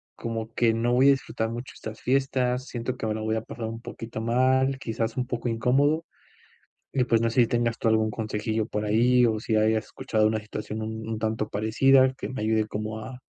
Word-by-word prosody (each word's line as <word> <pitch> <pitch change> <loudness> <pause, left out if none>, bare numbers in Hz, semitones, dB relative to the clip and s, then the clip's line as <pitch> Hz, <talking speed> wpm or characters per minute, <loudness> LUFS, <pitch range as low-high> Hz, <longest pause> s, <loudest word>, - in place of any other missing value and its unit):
como 115 -1 -5
que 115 -2 +3
no 120 +2 +1
voy 130 +3 +5
a - - +8
disfrutar 115 -4 -1
mucho 120 +2 -6
estas 110 0 -8
fiestas, 130 -1 0
siento 120 +1 -4
que 110 - -3
me 105 - 0
la 110 - -4
voy 110 0 0
a 110 - -1
pasar 115 0 -7
un 115 +1 -5
poquito 115 -1 -7
mal, 130 +3 +2
quizás, 115 0 -3
un 125 0 -1
poco 120 -1 -2
incómodo. 140 +8 +2 0.9
Y 130 - +2
pues, 115 -2 +2
no 115 0 +1
sé 120 +1 +4
si - - +3
tengas 120 -1 0
tú 115 - +1
algún 110 0 +2
consejillo 110 0 -2
por 105 -1 -3
ahí 120 +3 +4
o 110 -1 0
si 110 -1 0
hayas 110 0 +2
escuchado 110 -1 0
una 110 0 +1
situación 105 +1 -6
un 110 0 -5
un 110 -1 -3
tanto 110 -1 -1
parecida, 130 +5 +4
que - - -5
me 130 -5 -5
ayude 110 0 +1
como 110 +1 -4
a 125 +3 -8
115 Hz, 220 wpm, -26 LUFS, 110-125 Hz, 0.9 s, a